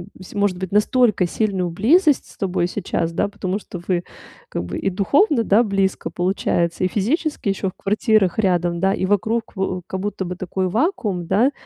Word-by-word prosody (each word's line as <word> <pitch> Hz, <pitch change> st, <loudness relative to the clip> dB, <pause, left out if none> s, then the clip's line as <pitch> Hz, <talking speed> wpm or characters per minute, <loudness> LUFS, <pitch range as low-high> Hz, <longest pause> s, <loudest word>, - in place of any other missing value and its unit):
б 185 Hz, -, -12 dB
сь -, -, -12 dB
может 200 Hz, -3 st, +1 dB
быть, 185 Hz, -1 st, -5 dB
настолько 210 Hz, -2 st, +3 dB
сильную 190 Hz, -2 st, -1 dB
близость 290 Hz, -, +3 dB
с -, -, -19 dB
тобой 185 Hz, -2 st, 0 dB
сейчас, 170 Hz, -3 st, -2 dB
да. -, -, +1 dB
Потому 200 Hz, -1 st, -3 dB
что 180 Hz, -3 st, -9 dB
вы 180 Hz, -2 st, +1 dB, 0.5 s
как -, -, -3 dB
бы 90 Hz, +1 st, -5 dB
и -, -, 0 dB
духовно, 240 Hz, -, +2 dB
да, 215 Hz, +3 st, +4 dB
близко 195 Hz, -3 st, 0 dB
получается, 175 Hz, -2 st, 0 dB
и 185 Hz, -, +4 dB
физически 260 Hz, -, -1 dB
ещё 195 Hz, 0 st, -1 dB
в -, -, -12 dB
квартирах 210 Hz, -1 st, +2 dB
рядом, 175 Hz, -4 st, +1 dB
да, 195 Hz, +1 st, +2 dB
и 190 Hz, -, -1 dB
вокруг 220 Hz, +4 st, 0 dB
в 185 Hz, -1 st, -2 dB
как 190 Hz, -, -4 dB
будто 200 Hz, -1 st, -3 dB
бы 180 Hz, +1 st, -4 dB
такой 185 Hz, +1 st, -2 dB
вакуум, 215 Hz, -, -1 dB
да. 235 Hz, +10 st, +3 dB
195 Hz, 190 wpm, -21 LUFS, 180-215 Hz, 0.5 s, да